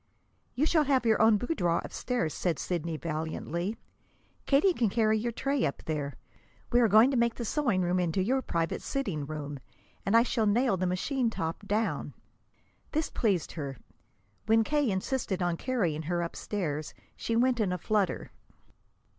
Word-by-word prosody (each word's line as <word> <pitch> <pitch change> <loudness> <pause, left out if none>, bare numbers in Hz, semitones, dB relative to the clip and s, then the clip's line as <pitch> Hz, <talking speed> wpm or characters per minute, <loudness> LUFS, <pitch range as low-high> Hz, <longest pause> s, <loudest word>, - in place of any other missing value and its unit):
"You 285 - +2
shall 315 -2 +3
have 265 -3 +2
your 220 -2 +3
own 220 -1 +6
boudoir 180 - 0
upstairs," 240 - -2
said 175 -3 -1
Sidney 165 -2 -2
valiantly. 165 +5 -3 0.7
"Katie 295 +7 +4
can 235 -9 +1
carry 220 0 +2
your 235 +2 -2
tray 275 +3 -1
up 140 - -2
there. 145 -3 -3 0.6
We 240 - +5
are 235 - +5
going 220 +6 +6
to 265 - +1
make 235 -1 +2
the 235 - -4
sewing 230 -8 +1
room 180 +1 +1
into 180 +2 +1
your 260 +6 +1
private 165 -8 -2
sitting 195 - -3
room, 145 -2 -5 0.4
and 205 +4 +4
I 230 - +6
shall 230 -3 0
nail 235 +1 +3
the 185 0 -1
machine 235 +8 0
top 165 0 -4
down." 215 +3 -1 0.8
This 310 0 0
pleased 195 -8 0
her. 140 -5 -5 0.7
When 225 +1 +5
K. 290 +1 +1
insisted 195 0 -1
on 175 -1 +1
carrying 180 - -1
her 175 +2 -1
upstairs, 165 -3 -4 0.2
she 230 - -2
went 245 +1 +3
in 205 -4 +1
a 180 - -1
flutter. 205 +2 -1
210 Hz, 165 wpm, -29 LUFS, 170-245 Hz, 0.8 s, own